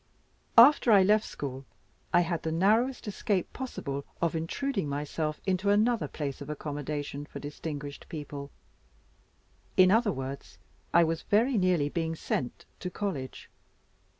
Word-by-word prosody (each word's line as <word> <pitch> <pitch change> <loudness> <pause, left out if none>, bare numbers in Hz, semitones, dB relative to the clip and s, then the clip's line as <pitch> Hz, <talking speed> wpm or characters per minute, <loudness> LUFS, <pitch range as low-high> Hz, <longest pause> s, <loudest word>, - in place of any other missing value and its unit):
After 245 0 +8
I 200 -3 +7
left 210 +3 +4
school, 135 -1 -6 0.5
I 175 - +5
had 170 -1 -1
the 160 - -2
narrowest 220 +9 +2
escape 200 -2 -1
possible 140 - -4 0.2
of 170 -1 0
intruding 190 - -2
myself 150 +2 -2
into 190 +1 +1
another 215 +3 +3
place 145 -2 -5
of 140 - -7
accommodation 145 -1 -4
for - - -9
distinguished 145 -1 -6
people; 145 -2 -6 1.3
in 185 0 +7
other 220 0 +4
words, 135 0 -6 0.3
I 170 - +6
was 165 0 -1
very 235 +6 +2
nearly 180 -7 +2
being 165 +1 -2
sent 130 -5 -3
to 180 - -4
college. 180 -10 -4
165 Hz, 135 wpm, -29 LUFS, 145-205 Hz, 1.3 s, After